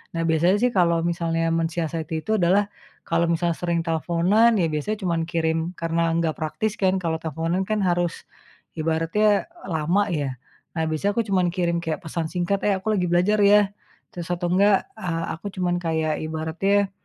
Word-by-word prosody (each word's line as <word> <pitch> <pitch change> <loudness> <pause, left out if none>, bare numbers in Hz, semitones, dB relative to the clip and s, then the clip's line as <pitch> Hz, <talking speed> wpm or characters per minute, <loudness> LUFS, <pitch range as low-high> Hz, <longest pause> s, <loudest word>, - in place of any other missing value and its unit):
nah 165 - 0
biasanya 165 +3 +3
sih 250 - +3
kalau 170 -5 +2
misalnya 165 -1 0
mensiasati 165 -1 -2
itu 220 0 0
adalah 195 +4 +2 0.3
kalau 165 0 +1
misalnya 170 0 0
sering 170 -1 0
teleponan 175 +8 +2
ya 180 -5 +2
biasanya 155 +8 -2
cuman 170 -2 0
kirim 160 -1 0 0.2
karena 165 0 0
nggak 165 -2 0
praktis 200 +7 -2
kan 190 -1 +2
kalau 160 -1 -1
teleponan 165 +4 -2
kan 215 -1 0
harus 175 -2 0 0.6
ibaratnya 165 +7 +1 0.2
lama 175 +5 +1
ya. 140 -4 -2 0.4
Nah 160 - +1
biasanya 160 +6 0
aku 230 - +3
cuman 185 -3 +2
kirim 170 -2 0
kayak 160 -1 -2
pesan 160 0 -3
singkat, 180 +3 0
"Eh 205 - +3
aku 190 +3 -2
lagi 180 -4 0
belajar 185 +5 +3
ya." 205 0 +5 0.4
Terus 175 -2 -6
atau 175 0 -1
enggak, 200 +1 +4 0.2
eee, 165 -2 -2
aku 165 - -11
cuman 180 -2 0
kayak 160 -2 -1
ibaratnya 170 +6 0
170 Hz, 170 wpm, -23 LUFS, 165-190 Hz, 0.6 s, ya